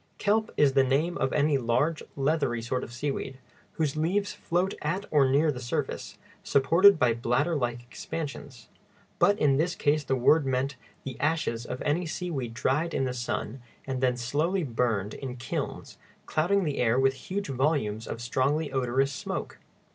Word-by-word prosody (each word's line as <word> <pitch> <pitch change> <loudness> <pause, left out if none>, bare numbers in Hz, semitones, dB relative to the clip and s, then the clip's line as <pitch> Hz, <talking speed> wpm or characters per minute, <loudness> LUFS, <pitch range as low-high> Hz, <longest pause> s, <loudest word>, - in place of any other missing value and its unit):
Kelp 215 +1 +1
is 140 -2 +4
the 135 -1 +5
name 145 +7 +1
of 135 - +1
any 145 -1 +2
large, 140 +7 +1
leathery 140 -4 0
sort 125 +2 -2
of - - -8
seaweed, 135 +1 -4 0.4
whose 155 -3 -1
leaves 185 +6 0
float 180 +3 -1
at 185 +7 -2
or 140 -3 +4
near 150 +4 +3
the 125 - -6
surface, 120 -1 -4 0.3
supported 170 +8 +5
by 125 -5 +3
bladder 125 +8 0
like 120 -3 -2
expansions; 140 -1 -7 0.5
but 205 0 +4
in 140 -2 +3
this 170 +3 0
case 150 0 +1
the 135 - 0
word 145 +5 +4
meant 135 +1 -1 0.3
the 130 -3 -7
ashes 145 -7 -1
of 125 - -5
any 165 +4 0
seaweed 145 -9 -4
dried 150 +8 0
in - - +1
the 130 -1 -1
sun 120 0 -4 0.2
and 130 -1 -3
then 125 -1 +2
slowly 155 +10 0
burned 115 -6 -1
in 130 -2 -6
kilns, 125 - -5 0.3
clouding 190 +6 +1
the 150 -4 -2
air 120 +1 +3
with 135 0 +3 0.2
huge 195 -3 -2
volumes 130 -6 0
of 115 - -5
strongly 140 +5 0
odorous 135 +1 +1
smoke. - - -5
135 Hz, 170 wpm, -28 LUFS, 125-160 Hz, 0.5 s, the